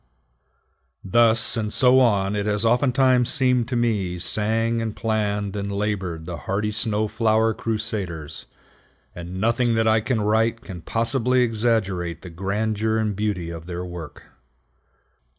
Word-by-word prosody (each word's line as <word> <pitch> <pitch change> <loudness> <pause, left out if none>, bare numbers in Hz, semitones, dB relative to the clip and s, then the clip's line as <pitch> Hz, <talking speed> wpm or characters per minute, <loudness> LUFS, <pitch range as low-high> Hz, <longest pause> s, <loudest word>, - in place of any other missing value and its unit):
Thus 115 +3 +3
and 110 -2 -2
so 125 +4 +4
on 100 -5 +2
it 100 0 -2
has 105 +1 0
oftentimes 125 +1 +3
seemed 125 -4 +2
to 125 - -3
me 105 -7 0
sang 115 +5 0
and 110 -2 -4
planned 105 -2 -1
and 100 0 -3
labored 100 -5 -3
the 85 -1 -5
hearty 100 +8 -2
snow 110 0 0
flower 110 +1 +2
crusaders; 105 -9 -4 0.7
and 90 +2 -7
nothing 115 +2 +1
that 115 0 +2
I 110 0 +3
can 120 +1 -1
write 110 +2 +1
can 95 -9 -9
possibly 125 - +2
exaggerate 105 -7 -1
the 90 - -9
grandeur 105 +4 -1
and 110 -2 -1
beauty 95 -5 -2
of 85 0 -9
their 90 0 -5
work. 85 -3 -9
110 Hz, 140 wpm, -23 LUFS, 95-115 Hz, 0.7 s, so